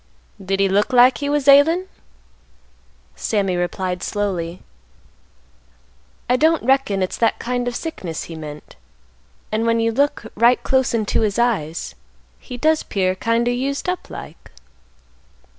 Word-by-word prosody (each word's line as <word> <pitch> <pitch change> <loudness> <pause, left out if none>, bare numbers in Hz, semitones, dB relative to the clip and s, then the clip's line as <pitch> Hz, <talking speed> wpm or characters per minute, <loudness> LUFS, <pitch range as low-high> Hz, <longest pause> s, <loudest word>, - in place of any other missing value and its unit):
"Did 195 +1 -1
he 195 - +3
look 205 +5 +1
like 250 +1 +6
he 285 - -2
was 290 -1 0
ailin'?" 310 +6 +6 1.3
Sammy 195 -4 -1
replied 180 +1 -2
slowly, 180 -5 -3 1.6
"I 250 - +3
don't 320 +3 +2
reckon 245 -7 +2
it's 185 - -3
that 230 - +1
kind 245 0 -2
of 245 - -3
sickness 185 - -5
he 170 - -9
meant; 150 -1 -9 0.8
and 220 +1 0
when 230 0 +2
you 230 0 +1
look 280 0 0
right 235 +3 +3
close 265 -3 +1
into 215 -1 0
his 210 -1 0
eyes, 205 -10 -1 0.5
he 250 - -9
does 310 +4 +2
'pear 185 -2 -1
kind 230 +5 0
o' - - +2
used 270 +5 -2
up 360 0 -3
like." - - -10
230 Hz, 140 wpm, -20 LUFS, 190-265 Hz, 1.6 s, like